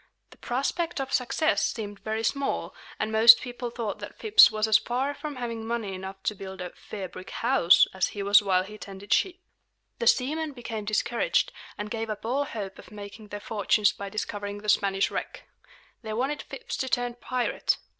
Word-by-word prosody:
The - - -16
prospect 305 +7 -1
of 270 0 -4
success 310 +5 +1
seemed 205 -3 -3
very 220 +1 -3
small, 275 +5 -1 0.3
and 215 0 -1
most 225 +1 +9
people 245 -1 -5
thought 230 -3 -4
that - - -9
Phips 440 0 +7
was 215 0 0
as 215 0 +6
far 255 +6 -1
from 290 0 -6
having 230 -3 -4
money 225 -3 -3
enough 190 +1 -8
to - - 0
build 190 -1 -9
a 180 -1 -5
"fair 195 -3 -7
brick 185 +1 -10
house" 235 -8 +5
as 190 0 +1
he 205 - -5
was 200 +1 +6
while 185 -2 +2
he 210 +2 -11
tended 195 0 -4
sheep. 370 -1 +1 0.6
The 475 - 0
seamen 300 +4 +2
became 230 -4 -6
discouraged, 225 - +1 0.3
and 210 0 -5
gave 225 -1 -3
up 215 0 -5
all 270 +5 0
hope 200 -7 -6
of - - -13
making 210 +1 -10
their 205 0 -6
fortunes 205 -1 +2
by 200 0 -7
discovering 205 -1 -4
the 210 - -4
Spanish 195 -1 +2
wreck. - - -5 0.5
They 220 -2 -5
wanted 270 +6 -1
Phips - - -7
to 260 - -2
turn 245 -1 0
pirate. 245 0 -1
220 Hz, 190 wpm, -27 LUFS, 205-250 Hz, 0.6 s, most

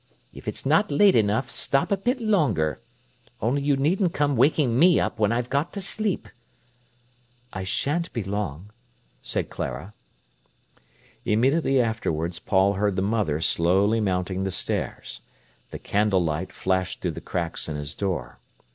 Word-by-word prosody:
If - - -12
it's - - -3
not 160 +9 +3
late 190 +7 +5
enough, 110 +3 +1
stop 140 +9 0
a - - +5
bit 245 +7 -1
longer. 140 - +1 0.6
Only 125 +6 0
you 140 -1 +2
needn't 170 +5 +1
come 145 -1 +1
waking 130 -1 +3
me 175 +2 +6
up - - -2
when 105 -1 +3
I've 120 +1 -1
got 145 +5 0
to 200 - -4
sleep." 205 +1 -1 1.3
"I 95 - -4
shan't 150 - -1
be 115 - -3
long," 100 -2 -4 0.5
said - - -3
Clara. 100 +3 -5 1.3
Immediately 135 +5 +2
afterwards 85 -8 -1
Paul 95 0 +2
heard 100 0 0
the 95 - 0
mother 100 -8 0
slowly 95 +7 +2
mounting 95 -2 -1
the 95 - -1
stairs. 95 - -4 0.5
The - - -6
candlelight 95 -4 0
flashed 95 -1 -1
through - - -1
the - - -8
cracks 85 -2 -3
in 75 - -3
his 75 0 -4
door. 85 -12 -3
105 Hz, 145 wpm, -25 LUFS, 95-145 Hz, 1.3 s, me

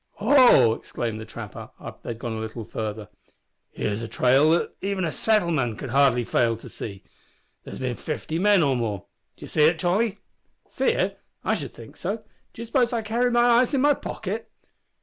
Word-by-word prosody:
"Ho!" 225 - +6
exclaimed 115 -1 -4
the 110 - -9
trapper, - - -8
after - - -9
they - - -8
had 115 - -4
gone 120 0 -4
a 110 - -4
little 110 0 -6
farther; 105 -1 -5 0.6
"here's 105 +1 -3
a 115 - -4
trail 130 +6 +3
that 165 +2 +1
even 195 -2 -1
a 160 - -1
settlement 205 -6 +1
man 120 -5 0
could 135 - -6
hardly 135 -3 +4
fail 115 0 +1
to - - -12
see. 100 -2 -8 0.6
There's - - -8
bin 125 -2 -3
fifty 155 +1 -4
men 200 -2 +4
or 135 -2 +2
more. 110 -6 -3 0.3
D'ye - - -9
see 150 - +3
it 165 +2 +4
Tolly?" 190 +5 +1 0.5
"See - - -2
it? 470 - 0 0.2
I - - +1
should - - -4
think - - -13
so. 210 +5 -3 0.3
D'you 230 - -8
suppose 245 +1 +1
I 230 -2 -1
carry 235 +3 +1
my 240 0 +3
eyes 245 +3 +4
in 265 - +2
my 290 +1 +5
pocket?" - - -5
155 Hz, 195 wpm, -25 LUFS, -, 0.6 s, Ho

